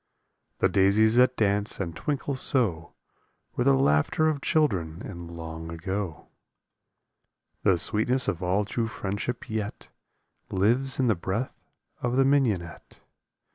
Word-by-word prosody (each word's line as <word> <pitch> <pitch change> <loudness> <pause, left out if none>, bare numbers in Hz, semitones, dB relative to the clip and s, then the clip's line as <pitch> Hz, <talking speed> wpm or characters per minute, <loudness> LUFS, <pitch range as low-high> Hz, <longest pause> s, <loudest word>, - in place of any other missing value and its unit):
The - - +3
daisies 105 +4 +3
that 125 0 +4
dance 105 -1 0
and 85 -4 -4
twinkle 140 - -3
so 105 - -1 0.6
Were 125 - 0
the 135 +1 +4
laughter 135 - +2
of 145 -3 -2
children 90 - 0
in 85 -4 -8
long 80 -1 -8
ago. 90 +1 -4 1.4
The 95 - +3
sweetness 120 +8 +4
of 85 - -2
all 95 +3 +1
true 115 +2 -2
friendship 105 +3 -4
yet 110 -2 -5 0.6
Lives 120 +9 +1
in 130 - +3
the 115 - +4
breath 100 +7 -5 0.3
of 125 0 -1
the 135 0 +4
mignonette. 110 -12 -1
105 Hz, 130 wpm, -26 LUFS, 90-125 Hz, 1.4 s, that